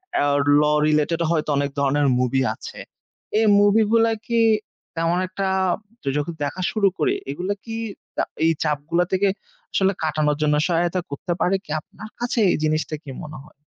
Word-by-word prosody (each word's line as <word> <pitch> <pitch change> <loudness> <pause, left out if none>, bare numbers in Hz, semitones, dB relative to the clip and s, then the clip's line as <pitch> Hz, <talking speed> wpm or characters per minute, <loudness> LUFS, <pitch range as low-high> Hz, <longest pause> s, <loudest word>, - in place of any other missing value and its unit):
অ্যাও 145 0 +2 0.2
ল - - +4 0.3
related 155 +2 +1
হয়তো 155 -2 0
অনেক 140 0 0
ধরনের 140 +1 +2
মুভি 125 +1 +1
আছে। - - -10 0.6
এই 225 - +3
মুভিগুলা 220 +2 +4
কি 235 -1 +1 0.6
তেমন 165 +1 +1
একটা 190 +1 -3 0.7
যখ 145 - 0 0.2
দেখা 145 +6 -3
শুরু 210 -3 +2
করি? 150 - +1 0.2
এগুলা 180 +8 -2
কি 225 -1 -5 0.4
দা - - +2 0.2
এই 165 - +5
চাপগুলা 155 +3 0
থেকে 190 +2 +2 0.5
আসলে 195 0 +3
কাটানোর 150 -1 +1
জন্য 150 -1 +3
সহায়তা 175 +1 +1
করতে 145 +5 -3
পারে? 185 +2 +3
কি 150 - -11
আপনার 200 +5 -12
কাছে 240 0 -1
এই - - +2
জিনিসটা 155 0 0
কি 140 - -10
মনে 155 0 -8
হয়? 150 - -19
165 Hz, 165 wpm, -22 LUFS, 150-195 Hz, 0.7 s, এই